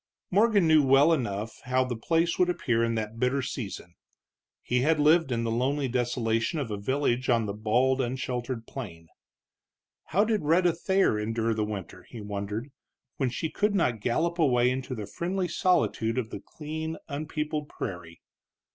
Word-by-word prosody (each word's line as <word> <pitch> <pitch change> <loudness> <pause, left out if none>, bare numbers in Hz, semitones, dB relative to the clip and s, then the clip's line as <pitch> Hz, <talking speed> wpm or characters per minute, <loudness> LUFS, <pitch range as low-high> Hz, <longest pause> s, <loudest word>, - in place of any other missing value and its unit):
Morgan 205 -2 +4
knew 155 -1 +6
well 140 +4 +5
enough 110 -6 -3
how 130 +1 +2
the 125 -1 -3
place 165 +8 0
would 180 -1 +4
appear 120 -10 +1
in 115 0 0
that 110 +1 -4
bitter 130 +2 +1
season; 100 -8 -6 0.7
he 125 - +1
had 155 +3 +2
lived 155 -1 +4
in 115 -1 0
the 115 - -1
lonely 135 +4 0
desolation 120 +1 0
of 135 -7 -3
a 105 - -2
village 130 +3 0
on 115 -2 +3
the 100 - -3
bald, 125 +5 +2
unsheltered 125 -1 -3
plain. 85 -12 -8 1.0
How 195 +7 +2
did 220 -2 +1
Rhetta 170 +3 +3
Thayer 190 - +1
endure 115 +1 0
the 110 -1 -1
winter, 105 -3 -6
he 120 - -9
wondered, 105 +5 -5 0.5
when 135 -3 +1
she 155 +6 -3
could 210 0 +1
not 125 - +1
gallop 165 - 0
away 125 -5 +4
into 130 0 -3
the 105 -3 -5
friendly 180 - -2
solitude 115 - +1
of 115 -3 -2
the - - -5
clean, 160 +6 -6
unpeopled 150 0 -3
prairie? 85 -3 -7
130 Hz, 165 wpm, -27 LUFS, 115-155 Hz, 1.0 s, knew